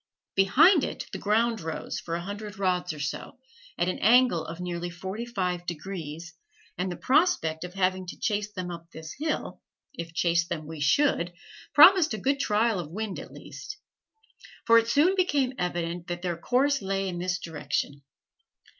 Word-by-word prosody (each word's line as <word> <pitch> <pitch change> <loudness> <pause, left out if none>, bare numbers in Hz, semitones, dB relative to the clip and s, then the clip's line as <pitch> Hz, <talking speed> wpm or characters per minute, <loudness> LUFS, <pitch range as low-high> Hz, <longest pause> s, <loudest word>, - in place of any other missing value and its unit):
Behind 275 - +5
it - - -4
the - - -5
ground 225 +2 +1
rose, 160 -1 -4
for 165 - -4
a 170 - -3
hundred 205 +1 -7
rods 180 -2 0
or 155 - -8
so, 145 - -5 0.4
at 175 - +1
an 185 - -2
angle 240 -6 +5
of 165 +1 -8
nearly 175 -1 -4
forty 190 +7 -6
five 180 -6 -2
degrees, 170 -1 -6 0.4
and 180 +1 -2
the - - -4
prospect 260 - +2
of 180 +1 -8
having 185 -1 0
to - - -7
chase 210 -1 -1
them 185 -3 -5
up 170 -1 -9
this 160 -1 -9
hill, 310 0 -3 0.3
if 170 -10 -6
chase 170 0 +1
them 160 -3 -4
we 160 0 -8
should, 175 - +2 0.4
promised 330 - +8
a - - -5
good 275 +7 0
trial 220 -4 +2
of 165 -4 -5
wind 205 +3 -4
at - - -10
least; 425 - -9 0.9
for 230 0 +7
it 230 - -2
soon 300 +10 +4
became 290 -9 +1
evident 175 -1 -2
that 175 0 -5
their 175 -2 -1
course 270 +9 +1
lay 195 0 -1
in 175 -2 -4
this 180 0 -1
direction. 145 -3 -3
185 Hz, 175 wpm, -27 LUFS, 170-230 Hz, 0.9 s, promised